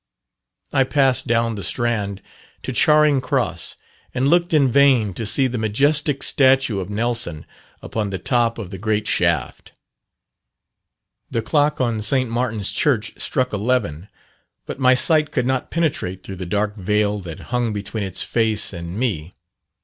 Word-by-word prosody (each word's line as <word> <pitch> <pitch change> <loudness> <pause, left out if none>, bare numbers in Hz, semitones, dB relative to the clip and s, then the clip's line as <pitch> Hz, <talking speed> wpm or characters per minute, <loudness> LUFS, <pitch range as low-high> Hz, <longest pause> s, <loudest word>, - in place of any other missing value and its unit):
I 135 -2 +4
passed 135 -2 +2
down 115 0 +1
the 105 - -6
Strand 105 -2 -1 0.4
to - - -3
Charing 150 -3 +4
Cross, 130 - -1 0.4
and 130 +2 +1
looked 175 +1 +2
in 140 -5 +3
vain 130 -7 +4
to 110 +3 -4
see 135 +5 +3
the 125 -2 -2
majestic 140 +6 +1
statue 130 -6 +3
of 95 0 -5
Nelson 115 -6 -2 0.4
upon 105 -2 -3
the 95 - -3
top 115 +4 0
of 100 -5 -7
the 95 - -7
great 105 +1 -1
shaft. 85 -7 -1 1.6
The 115 - -2
clock 150 +3 +1
on 115 -4 0
St. 130 +2 0
Martin's 115 -4 0
Church 120 -7 0
struck 130 -5 0
eleven, 105 -6 -1 0.6
but - - -7
my 130 -1 +5
sight 155 +2 +2
could - - 0
not 130 0 -1
penetrate 130 - -2
through 95 - -8
the 90 -1 -6
dark 105 +3 -1
veil 105 +1 0
that 85 -4 -8
hung 120 -2 0
between 105 +1 -4
its 95 -2 -1
face 110 -3 0
and 85 +1 -7
me. 95 -10 -2
115 Hz, 155 wpm, -21 LUFS, 100-130 Hz, 1.6 s, my